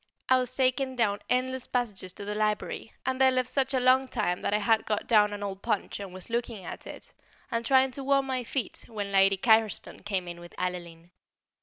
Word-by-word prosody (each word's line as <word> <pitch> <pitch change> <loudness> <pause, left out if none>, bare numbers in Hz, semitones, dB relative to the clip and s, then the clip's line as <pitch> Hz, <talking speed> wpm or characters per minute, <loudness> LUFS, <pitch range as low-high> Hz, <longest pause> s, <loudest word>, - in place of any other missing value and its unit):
I 260 0 +6
was 255 0 -1
taken 260 0 +1
down 210 -4 +1
endless 255 0 0
passages 210 -7 -2
to 200 - -8
the 210 - -3
library, 210 +1 -1
and 260 0 -1
there 265 - +7
left 255 -1 +1
such 270 +1 +1
a - - +3
long 255 +1 +4
time 210 -8 -1
that - - -1
I 210 - +3
had 220 +1 +2
got 210 -1 -1
down 210 -3 +4
an 205 0 -5
old 195 -1 -5
Punch 215 -4 -2
and 200 -2 -7
was 185 0 -9
looking 230 -5 -2
at - - -7
it, - - -9 0.4
and 230 0 0
trying 265 +1 +4
to 275 +2 -6
warm 275 0 +3
my 260 -2 -2
feet, 250 +1 -3
when 205 -3 -4
Lady 195 0 +5
Carriston 220 -2 +2
came 190 -3 -2
in 175 0 -7
with 175 -1 -12
Adeline. 175 -2 -5
225 Hz, 215 wpm, -28 LUFS, 200-255 Hz, 0.4 s, there